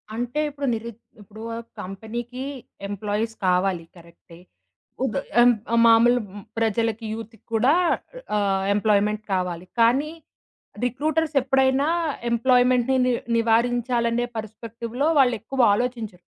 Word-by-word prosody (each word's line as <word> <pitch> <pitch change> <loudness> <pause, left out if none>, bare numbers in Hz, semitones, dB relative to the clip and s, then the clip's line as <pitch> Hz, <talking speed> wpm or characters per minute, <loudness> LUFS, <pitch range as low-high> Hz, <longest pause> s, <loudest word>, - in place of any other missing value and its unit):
అంటే 245 +5 -2
ఇప్పుడు 280 -1 -4
నిరుద్ 230 0 -6 0.2
ఇప్పుడూ 215 +2 -12 0.4
కంపెనీకి 230 +6 -6 0.5
ఎంప్లాయీస్ 210 +2 -2
కావాలి 180 -1 +1
కరెక్టే. 170 0 -17 0.7
ఉగ 265 - -1 0.3
అన్ 245 0 +6 0.2
ఆహ్, 235 - +4
మామూలు 235 +2 +5 0.4
ప్రజలకి 225 0 0
యూత్‌కి 225 0 -8
కూడా 245 +6 +4 0.6
అ - - +3
ఆహ్, 195 -1 +1
ఎంప్లాయిమెంట్ 210 0 +1
కావాలి. 180 -2 -2
కానీ 265 +7 +3 0.7
రిక్రూటర్స్ 310 +5 -1
ఎప్పుడైనా 265 +2 +2 0.4
ఎంప్లాయిమెంట్‌ని 250 +1 +3
ని 250 - +2 0.2
నివారించాలనే 235 +1 +1
పర్‌స్పెక్టివ్‌లో 230 +4 -4
వాళ్ళెక్కువ 245 0 +1
ఆలోచించరు. 220 -6 -3
230 Hz, 105 wpm, -24 LUFS, 210-250 Hz, 0.7 s, అన్